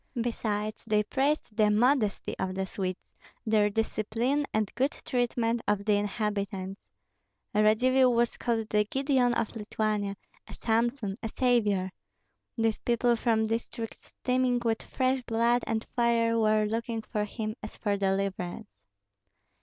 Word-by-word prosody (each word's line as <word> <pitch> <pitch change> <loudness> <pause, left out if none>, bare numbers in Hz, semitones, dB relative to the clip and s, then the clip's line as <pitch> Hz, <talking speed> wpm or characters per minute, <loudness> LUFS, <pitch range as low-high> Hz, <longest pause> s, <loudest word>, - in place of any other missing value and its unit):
Besides, 215 -2 -2
they 210 -1 +3
praised 270 0 0
the 210 -1 +4
"modesty" 220 0 +2
of 185 0 -2
the 190 0 -1
Swedes, 185 -1 -5 0.3
their 215 -2 +3
discipline, 225 +6 0
and 215 -2 -1
good 260 +3 +2 0.2
treatment 240 -2 0
of 205 -1 +1
the 215 - +3
inhabitants. 200 -2 -2 0.7
Radzivill 250 +5 +4
was 235 0 +1
called 225 -2 -1
the 210 0 +3
Gideon 265 0 +1
of 230 -1 -2
Lithuania, 210 -2 -2 0.3
a - - -9
Samson, 230 -2 0
a 225 - -2
savior. 210 -7 +1 0.7
These 225 -1 +1
people 240 0 +2
from 225 -1 +1
districts 225 0 -4
steaming 250 -1 +1
with 225 -1 +1
fresh 260 0 0
blood 235 +1 +1
and 220 0 -1
fire 235 -1 +3
were 215 -1 +3
looking 225 +1 -2
for 210 -1 -2
him 215 0 -4
as 215 - -7
for 205 -2 0
deliverance. 195 0 -2
225 Hz, 135 wpm, -29 LUFS, 210-240 Hz, 0.7 s, the